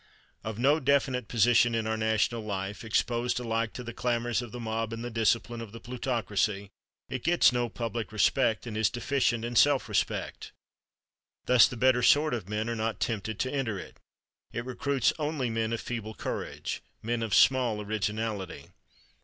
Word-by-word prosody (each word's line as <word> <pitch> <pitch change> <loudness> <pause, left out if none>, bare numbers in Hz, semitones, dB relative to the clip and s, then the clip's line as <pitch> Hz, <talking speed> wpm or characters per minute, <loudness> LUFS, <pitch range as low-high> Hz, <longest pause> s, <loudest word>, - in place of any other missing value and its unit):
Of 110 -1 -5
no 140 +6 +3
definite 135 -4 +1
position 120 +1 +4
in 115 -1 -1
our 110 0 0
national 110 +1 +1
life, 100 -1 -4
exposed 120 +2 0
alike 115 -2 -1
to 125 - -6
the 120 -1 -7
clamors 120 0 0
of 120 -3 -8
the 125 - -7
mob 115 -1 -3
and 115 +1 -5
the 120 - -5
discipline 115 +1 0
of 110 -2 -9
the 115 - -8
plutocracy, 110 -5 -2 0.4
it 130 -2 -5
gets 175 -3 +5
no 120 -1 0
public 115 -1 -4
respect 110 +3 +2
and 115 -3 -6
is 110 0 +2
deficient 120 -1 0
in 120 0 -4
self - - +4
respect. - - -2 0.9
Thus 125 -2 +7
the 125 - -7
better 125 +1 +4
sort 150 +4 +4
of 105 -6 -4
men 105 +1 -2
are 115 - -2
not 110 0 -2
tempted 110 -1 -2
to 130 - -2
enter 125 -8 -1
it. - - -10 0.5
It 120 - -4
recruits 130 +1 0
only 150 -5 -1
men 115 0 -1
of 115 - -1
feeble 110 -3 -5
courage, - - -4 0.2
men 115 +1 -1
of 110 -3 0
small 125 -5 +4
originality. 105 -1 -3
115 Hz, 175 wpm, -29 LUFS, 110-125 Hz, 0.9 s, Thus